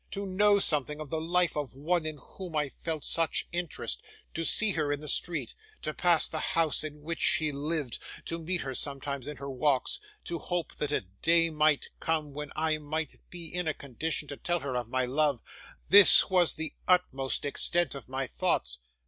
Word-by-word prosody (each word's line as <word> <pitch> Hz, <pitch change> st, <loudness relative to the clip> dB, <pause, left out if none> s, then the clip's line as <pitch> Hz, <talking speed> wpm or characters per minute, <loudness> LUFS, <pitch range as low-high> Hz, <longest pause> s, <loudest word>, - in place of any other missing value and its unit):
To 200 Hz, 0 st, -4 dB
know 205 Hz, +2 st, +3 dB
something 150 Hz, -5 st, +2 dB
of 155 Hz, -3 st, -8 dB
the 160 Hz, -, -1 dB
life 175 Hz, +1 st, +1 dB
of 145 Hz, -3 st, -4 dB
one 160 Hz, +3 st, -1 dB
in 155 Hz, -1 st, -5 dB
whom 175 Hz, +5 st, -9 dB
I 150 Hz, -2 st, 0 dB
felt 160 Hz, +1 st, -4 dB
such 165 Hz, -2 st, +2 dB
interest; 175 Hz, -2 st, -2 dB, 0.3 s
to 165 Hz, -, -3 dB
see 215 Hz, +5 st, +5 dB
her 155 Hz, -5 st, -1 dB
in 145 Hz, -, -1 dB
the 150 Hz, -, -8 dB
street, 150 Hz, -4 st, +2 dB, 0.3 s
to 155 Hz, -, -2 dB
pass 175 Hz, -2 st, +4 dB
the 155 Hz, -, -3 dB
house 160 Hz, -1 st, +1 dB
in 150 Hz, -1 st, -8 dB
which 165 Hz, +1 st, -4 dB
she 155 Hz, -2 st, +3 dB
lived, 145 Hz, -2 st, -3 dB, 0.3 s
to 165 Hz, -, -3 dB
meet 175 Hz, +2 st, -2 dB
her 135 Hz, -1 st, -4 dB
sometimes 140 Hz, 0 st, -1 dB
in 150 Hz, -, -6 dB
her 140 Hz, 0 st, -6 dB
walks, 140 Hz, -, +1 dB, 0.2 s
to 170 Hz, -2 st, -4 dB
hope 175 Hz, -2 st, -3 dB
that 150 Hz, -1 st, -2 dB
a -, -, +1 dB, 0.2 s
day 165 Hz, 0 st, +4 dB
might 155 Hz, -1 st, +1 dB
come 155 Hz, -3 st, -2 dB
when 150 Hz, 0 st, -6 dB
I 155 Hz, 0 st, 0 dB
might 155 Hz, 0 st, -4 dB
be 175 Hz, -1 st, -8 dB
in 180 Hz, -1 st, -2 dB
a 155 Hz, -, -1 dB
condition 150 Hz, +3 st, -3 dB
to 140 Hz, -, -6 dB
tell 175 Hz, -1 st, -1 dB
her 140 Hz, -2 st, -4 dB
of 120 Hz, -2 st, -3 dB
my 130 Hz, 0 st, 0 dB
love, 140 Hz, 0 st, +1 dB, 0.5 s
this 200 Hz, 0 st, +8 dB
was 180 Hz, -3 st, +3 dB
the 160 Hz, 0 st, -5 dB
utmost 140 Hz, -8 st, +1 dB
extent 170 Hz, +2 st, +1 dB
of 135 Hz, -3 st, -9 dB
my 135 Hz, +1 st, -2 dB
thoughts. 65 Hz, -, 0 dB
155 Hz, 200 wpm, -29 LUFS, 140-170 Hz, 0.5 s, this